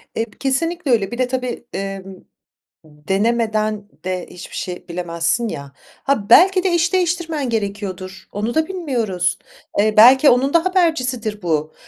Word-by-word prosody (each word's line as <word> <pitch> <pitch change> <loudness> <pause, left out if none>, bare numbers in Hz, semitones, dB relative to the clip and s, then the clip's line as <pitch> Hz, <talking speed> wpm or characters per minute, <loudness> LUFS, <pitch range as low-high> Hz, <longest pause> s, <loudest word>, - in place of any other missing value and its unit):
Eee, 225 - 0
kesinlikle 315 +3 -1
öyle. 205 -5 +1
Bir 240 - -5
de 255 0 +1
tabii, 250 -1 -4
emm, 195 0 -4 0.8
ımm, 150 -1 -21
denemeden 215 0 0 0.2
de 185 -1 -3
hiçbir 180 - -10
şey 180 -1 -6
bilemezsin, 170 +5 -1
ya. 140 -9 -7 0.3
Ha, 245 -8 0
belki 375 0 +6
de 380 - +1
iş 345 +2 +1
değiştirmen 335 -6 0
gerekiyordur 200 -4 -4
onu 215 +4 -3
da 315 0 +2
bilmiyoruz. 235 - -1 0.4
Eee, 215 +1 +3
belki 260 +6 +8
onun 260 +3 +2
da 335 0 +3
habercisidir 255 - 0
bu. 155 -3 -1
225 Hz, 145 wpm, -19 LUFS, 195-280 Hz, 0.8 s, belki